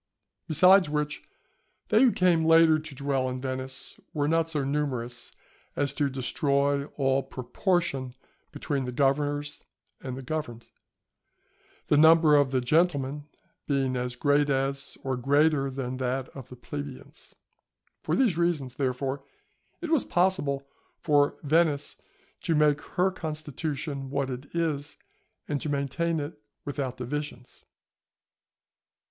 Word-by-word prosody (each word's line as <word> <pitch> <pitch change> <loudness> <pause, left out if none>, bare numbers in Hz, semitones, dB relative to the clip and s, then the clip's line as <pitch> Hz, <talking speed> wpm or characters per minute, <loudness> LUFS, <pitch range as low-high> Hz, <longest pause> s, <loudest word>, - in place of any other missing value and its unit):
Besides 180 +3 +6
which, 150 0 -2 0.7
they 215 +2 +5
who 260 -2 +6
came 175 -5 +3
later 165 -1 +6
to 155 -2 -10
dwell 135 -1 -1
in 130 0 -4
Venice 130 0 -5 0.2
were 145 -1 +1
not 165 +1 +2
so 150 -3 -1
numerous 130 -4 -3 0.4
as 145 -1 0
to 145 -2 0
destroy 140 +2 0
all 135 -1 +2
proportion 135 - -2 0.4
between 140 -3 -2
the 125 - -4
governors 145 +2 0 0.4
and 130 -1 -5
the 135 - -7
governed; 125 -5 -4 1.2
the 145 - +3
number 160 0 +7
of 145 -2 +4
the 130 -1 +1
"Gentlemen" 145 0 +1 0.4
being 135 -3 +1
as 125 0 -2
great 145 +2 +2
as, 135 0 -1
or 130 -1 -1
greater 140 +2 +2
than 130 -1 -4
that 130 +1 -2
of 135 -3 -11
the 125 - -10
"Plebeians." 140 +3 -9 0.7
For - - 0
these 220 -11 +2
reasons, 155 -7 0
therefore, 135 +1 -2 0.6
it 340 -2 -4
was 315 -6 +3
possible 175 -7 0 0.3
for 145 -2 +2
Venice 150 -1 +2 0.5
to 165 - 0
make 150 -1 +3 0.2
her 185 +2 +3
constitution 150 -4 -4
what 140 -1 -1
it 130 +3 -6
is, 150 -4 -2 0.5
and 145 -2 -2
to 155 - -3
maintain 145 +4 -1
it 145 -5 -6 0.2
without 140 -3 -3
divisions. 125 0 -6
145 Hz, 130 wpm, -27 LUFS, 135-155 Hz, 1.2 s, number